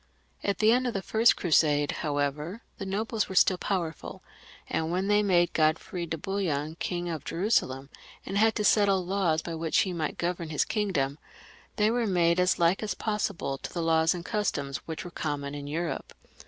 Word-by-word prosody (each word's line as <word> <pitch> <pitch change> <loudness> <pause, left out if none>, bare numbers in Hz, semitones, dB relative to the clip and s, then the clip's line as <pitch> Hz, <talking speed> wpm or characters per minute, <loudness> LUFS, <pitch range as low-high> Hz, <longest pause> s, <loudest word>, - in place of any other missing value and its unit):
At 200 - 0
the 215 +1 +4
end 250 +2 +2
of 240 - -3
the 195 - -2
first 225 +4 +4
Crusade, 145 -3 +2
however, 150 - -2 0.2
the 195 - -4
ngbles 215 +3 -1
were 190 - -6
still 185 0 +4
powerful, 170 -6 -3 0.4
and 160 0 -1
when 185 +2 0
they 210 0 +4
made 175 -4 +2
Godfrey 170 +3 0
de 165 - -3
Bouillon 160 -5 -2
King 175 -1 -2
of 160 -4 -4
Jerusalem, 140 - 0 0.3
and - - -5
had 220 +2 +4
to 210 - -1
settle 200 -3 +3
laws 175 -4 +1
by 170 - -5
which 160 0 +1
he 185 - -1
might 160 -3 -3
govern 170 -1 -2
his 150 - +1
kingdom, 155 -10 -1 0.6
they 210 0 +3
were 235 -1 0
made 175 -2 +3
as 180 0 +3
like 170 +2 +2
as 210 -4 -2
possible 200 -10 -2
to - - -7
the 170 - -3
laws 160 +1 +3
and 175 0 -7
customs 145 - -1
which 160 +1 -5
were 175 - -7
com 145 -3 -3
mon 140 0 -5
in 145 -1 -6
Europe. 160 +3 -3
175 Hz, 195 wpm, -28 LUFS, 155-200 Hz, 0.6 s, the